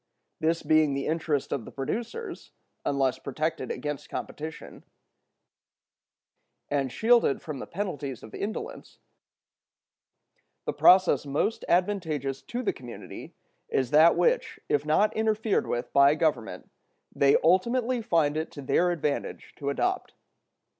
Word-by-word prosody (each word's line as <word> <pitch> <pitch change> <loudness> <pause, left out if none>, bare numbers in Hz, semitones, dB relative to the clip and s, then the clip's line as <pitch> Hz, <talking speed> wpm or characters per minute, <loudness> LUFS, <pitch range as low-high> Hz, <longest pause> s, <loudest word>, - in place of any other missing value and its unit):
This 165 +1 0
being 155 -2 +3
also - - -2
the 140 - -2
interest 155 -3 -1
of 125 - -2
the - - -10
producers, 235 - -5 0.3
unless 135 -2 0
protected 140 -1 -3
against 145 +2 -4
competition, 155 +1 -7 1.9
and 140 -3 0
shielded 230 - +3
from 150 -4 -7
the - - -7
penalties 150 - -4
of 110 - -12
indolence, 210 +2 -6 1.7
the - - -1
process 180 -6 +5
most 145 +10 -1
advantageous 160 -8 0
to 245 +1 -5
the - - 0
community 120 -2 -10 0.3
is 130 -3 0
that 155 +3 +6
which, 485 +1 +1
if 145 +1 0
not 200 +8 +3
interfered 220 -1 +1
with 120 0 -3
by 140 +1 +6
Government, 155 -7 -1 0.4
they 140 0 +5
ultimately 235 +8 +2
find 160 -8 +1
it 160 - -2
to 145 - -8
their 175 +6 +2
advantage 150 -4 -3
to 140 - -3
adopt. 370 - -1
155 Hz, 125 wpm, -27 LUFS, 140-200 Hz, 1.9 s, that